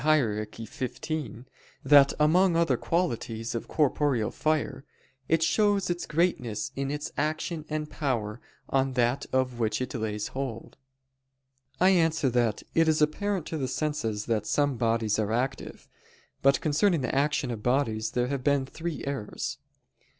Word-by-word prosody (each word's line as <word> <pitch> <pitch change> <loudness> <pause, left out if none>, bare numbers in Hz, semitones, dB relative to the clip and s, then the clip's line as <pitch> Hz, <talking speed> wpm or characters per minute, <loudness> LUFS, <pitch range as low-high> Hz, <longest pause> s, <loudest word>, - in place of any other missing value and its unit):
Hier. 115 -9 +2
xv) 130 +3 -5 0.4
that 140 0 +7
among 170 +4 +4
other 170 0 +3
qualities 120 -9 -2
of 115 - -4
corporeal 140 -6 +1
fire, 155 -3 -1 0.5
"it 160 0 +3
shows 205 +1 +2
its 175 0 -3
greatness 150 - 0
in 135 0 -2
its 150 +1 -4
action 155 +1 -2
and 155 0 -2
power 120 -8 -2 0.3
on 135 0 +1
that 120 +1 +1
of 130 -2 0
which 110 -2 0
it 130 -1 -4
lays 110 -3 -3
hold." 130 -4 -5 1.0
I 185 +2 +6
answer 160 -6 +2
that, 120 -3 +1
It 165 0 +4
is 155 -1 +3
apparent 180 +4 0
to 160 - -3
the 130 - -1
senses 125 -9 -2
that 110 -3 -1
some 145 -2 +1
bodies 115 -2 +1
are 105 -1 0
active. 130 +3 -3 0.5
But 135 0 +4
concerning 160 +2 +2
the 125 - -2
action 140 -2 +1
of 110 -3 -5
bodies 115 -3 +1
there 125 0 +1
have 140 -2 -2
been 140 -1 +2
three 165 +3 -5
errors. 135 -7 -4
135 Hz, 150 wpm, -28 LUFS, 115-155 Hz, 1.0 s, that